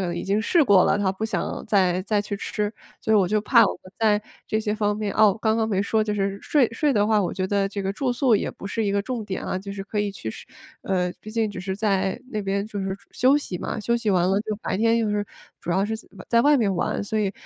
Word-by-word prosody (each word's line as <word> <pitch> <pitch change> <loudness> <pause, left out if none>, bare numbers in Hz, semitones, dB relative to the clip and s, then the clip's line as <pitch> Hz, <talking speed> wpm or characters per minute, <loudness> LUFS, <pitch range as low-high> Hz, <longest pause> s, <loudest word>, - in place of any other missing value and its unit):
能 175 - -3
已 - - -3
经 200 +2 +1
试 320 +8 +3
过 195 -5 +6
了， 200 - +2
她 195 -2 +1
不 205 +3 -4
想 215 -6 -3
再 185 -3 +2
再 205 +1 +1
去 205 0 -4
吃。 210 +1 -3 0.3
所 220 - 0
以 - - +6
我 195 -3 +4
就 215 0 +2
怕 230 +2 +5
我 - - 0
们 185 - -15
在 210 -2 +3 0.2
这 215 - 0
些 210 -1 -1
方 210 -1 0
面 210 -2 -2
啊， 215 0 +6
我 195 - +2
刚 220 0 +1
刚 220 -1 0
没 195 -3 +1
说， 215 +2 +1
就 210 - -1
是 195 -1 -1
睡 275 -6 +3
睡 285 +4 +1
的 205 -2 +2
话， 215 -2 +3
我 180 - -2
觉 185 -1 -2
得 200 0 +1
这 200 0 -4
个 195 +1 -1
住 250 +3 -1
宿 245 -3 +3
也 - - -2
不 - - -10
是 220 +2 -2
一 200 - 0
个 200 - +2
重 240 -1 -4
点 195 -2 -4
啊， 185 - -2
就 200 +1 -7
是 200 -1 -5
可 210 +1 -4
以 205 -1 -1
去 110 - -6
试 - - -11 0.4
呃， 180 -2 0
毕 215 - -9
竟 220 -1 0
只 200 - -7
是 190 +1 -3
在 195 0 0
那 215 -3 -2
边 200 +1 -1
就 210 -1 -6
是 190 0 -3 0.2
休 265 +4 +4
息 190 -11 -5
嘛， - - -4
休 235 +3 +1
息 230 -3 -1
完 180 -2 +3
了 195 - +3
就 215 -1 -3
白 185 - -1
天 230 +2 +3
就 225 - 0
是， 205 0 0 0.4
主 175 - -5
要 190 +3 +2
是 220 - -2 0.3
在 235 0 +4
外 290 +1 +5
面 205 -6 +1
玩， 175 - -1
所 220 +1 -2
以， 200 -2 0
205 Hz, 305 characters per minute, -24 LUFS, 195-220 Hz, 0.4 s, 过